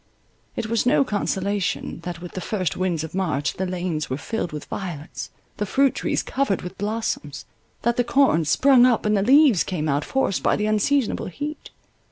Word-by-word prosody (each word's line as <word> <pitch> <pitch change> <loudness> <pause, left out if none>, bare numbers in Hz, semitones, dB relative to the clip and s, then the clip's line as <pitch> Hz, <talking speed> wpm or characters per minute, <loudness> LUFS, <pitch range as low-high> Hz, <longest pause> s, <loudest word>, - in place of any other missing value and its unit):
It - - -2
was 230 +2 0
no 275 - +4
consolation, 200 -5 -2
that 175 -1 -6
with 175 - -7
the 185 - -5
first 185 -6 -2
winds 180 -4 -1
of 160 - -7
March 160 -7 -1
the 190 - -1
lanes 175 -4 -3
were 130 - -2
filled 200 +3 -3
with 150 -1 -6
violets, 175 -5 -6 0.3
the 210 - -1
fruit 275 +5 +3
trees - - -1
covered 270 -9 -1
with 180 +2 -8
blossoms, 205 -9 -3 0.4
that 235 +1 +1
the 245 - +3
corn 250 - +3
sprung 255 - +5
up, 240 -4 +1
and 210 0 +3
the 195 - +2
leaves 265 - +5
came 160 -4 -3
out, 145 0 +1
forced 265 -8 0
by - - +2
the 210 - -1
unseasonable 215 +5 +1
heat. 295 - -6
195 Hz, 190 wpm, -23 LUFS, 170-240 Hz, 0.4 s, sprung